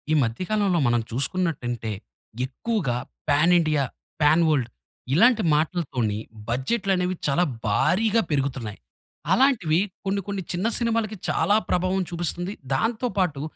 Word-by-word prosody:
ఈ - - +4
మధ్య 115 +8 -2
కాలంలో 200 -5 +2
మనం 120 0 +3
చూసుకున్నట్టంటే, 125 -4 -1 0.5
ఎక్కువగా 145 - -2 0.3
పాన్ 155 +5 +4
ఇండియా, 155 -3 +1 0.4
పాన్ 155 +3 +5
వల్డ్ 135 -6 +1 0.4
ఇలాంటి 225 - +5
మాటలతోని 150 - -1 0.3
బడ్జెట్లనేవి 185 - 0
చాలా 150 +5 +2 0.2
భారీగా 210 - +2
పెరుగుతున్నాయి. 130 -7 -2 0.5
అలాంటివి 205 - +3 0.3
కొన్ని 195 +1 0
కొన్ని 200 -1 -3
చిన్న 185 +5 0
సినిమాలకి 225 -2 0
చాలా 205 - +2
ప్రభావం 185 +2 +1
చూపిస్తుంది. 175 +2 -3 0.2
దాంతో 225 - 0
పాటు 170 -8 0
175 Hz, 115 wpm, -24 LUFS, 135-200 Hz, 0.5 s, పాన్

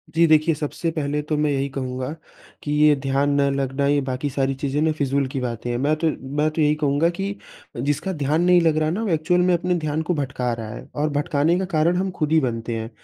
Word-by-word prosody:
जी, 170 - +5
देखिए 155 +1 +4
सबसे 155 +3 -3
पहले 150 -2 -2
तो 155 +1 -2
मैं 150 0 +1
यही 135 0 0
कहूँगा 130 -1 -4 0.5
कि 145 - -3
ये 150 0 +5
ध्यान 135 +1 +1
न 140 - +3
लगना, 135 0 -1
ये 145 0 +3
बाकी 130 +2 -3
सारी 135 0 -1
चीज़ें 140 +1 -2
ना, 160 - +3
फिज़ूल 140 -2 0
की 130 0 -4
बातें 120 -1 -4
हैं। 120 - -1
मैं 145 +5 +1
तो 160 +1 0 0.3
मैं 150 +1 +3
तो 160 - -2
यही 150 0 +3
कहूँगा 150 +2 +1
कि 200 +1 -3 0.4
जिसका 145 +9 -1
ध्यान 150 +1 0
नहीं 180 0 +5
लग 160 -2 +2
रहा 155 0 +1
ना, 210 +7 -2
वो 210 - -2
एक्चुअल 165 +2 +2
में 180 0 +3
अपने 180 +1 +1
ध्यान 155 0 -1
को 170 +3 -1
भटका 130 -3 -2
रहा 115 -2 -6
है। - - -10
और 150 +1 0
भटकाने 150 +2 +1
का 190 - -1
कारण 165 0 +2
हम 190 0 -1
खुद 155 -4 -2
ही 160 - +5
बनते 115 -3 -2
हैं। 110 +1 -5
150 Hz, 245 wpm, -22 LUFS, 135-160 Hz, 0.5 s, जी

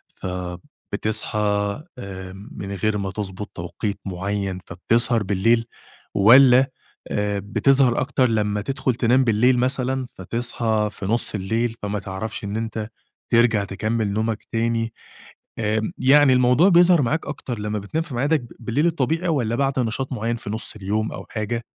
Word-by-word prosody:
فبتصحى 90 +4 -4 0.6
آآ 95 -4 -7 0.2
من 100 - -6
غير 105 +2 0
ما 100 -2 -3
تضبُط 100 0 -5
توقيت 100 +5 -4
معيّن، 95 0 -3
فبتسهر 115 +5 +1
بالليل، 115 +4 +2 0.5
والّا 125 +5 +7 0.4
آآ 105 -1 0
بتظهر 125 +5 +3
أكتر 130 -2 +1
لمّا 105 -2 0
تدخُل 130 +2 -1
تنام 125 +2 +3
بالليل 120 +2 +3
مثلًا 130 0 0
فتصحى 110 +1 -1
في 100 - -7
نُص 115 +2 -1
الليل، 115 +4 -1
فما 105 0 -2
تعرفش 95 +3 -5
إن 100 +2 -3
أنت 110 -1 -4 0.4
ترجع 115 -3 +4
تكمّل 110 +2 -1
نومك 110 +1 -1
تاني؟ 115 0 0 0.7
آمم، 110 0 0
يعني 135 +1 +6
الموضوع 125 +8 +5
بيظهر 175 -2 +6
معاك 155 +6 -1
أكتر 130 -5 -5
لمّا 105 0 -2
بتنام 155 +12 -2
في 140 -7 -8
معادك 145 +4 +2
ب 120 - -11
بالليل 120 +7 0
الطبيعي 165 +2 0
والّا 120 -7 0
بعد 135 0 0
نشاط 125 +3 -2
معيّن 115 0 -1
في 115 - -7
نُص 110 +1 -5
اليوم 105 +2 -2
أو - - -7
حاجة 115 +2 -3
115 Hz, 145 wpm, -22 LUFS, 105-125 Hz, 0.7 s, والّا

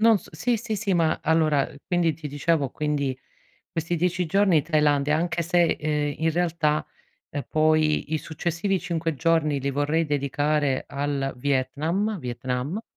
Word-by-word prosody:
Non 225 -2 +5
s - - -16
sì, 230 +10 0
sì, 220 0 -4
sì, 200 -2 0
ma 165 -2 +2
allora, 155 -3 +2
ehm, - - -14
quindi 175 -2 +2
ti 155 -1 -8
dicevo, 145 -1 0
quindi 145 -3 -1 0.5
questi 170 0 -2
10 180 +1 0
giorni 185 -4 +3
Thailandia, 150 -2 +2
anche 170 +1 -1
se, 175 +1 +3 0.2
ehm, 150 -1 -1
in 160 0 +2
realtà, 165 -3 +1 0.5
ehm, 145 - -4
poi 155 0 +2
i 155 - +2
successivi 175 +5 -2
5 165 -3 -2
giorni 155 -1 +1
li 140 +1 -1
vorrei 145 +4 +1
dedicare 145 -1 0
al 140 -1 -2
Vietnam, 145 - 0
Vietnam. 125 - -3
155 Hz, 155 wpm, -25 LUFS, 145-170 Hz, 0.5 s, Non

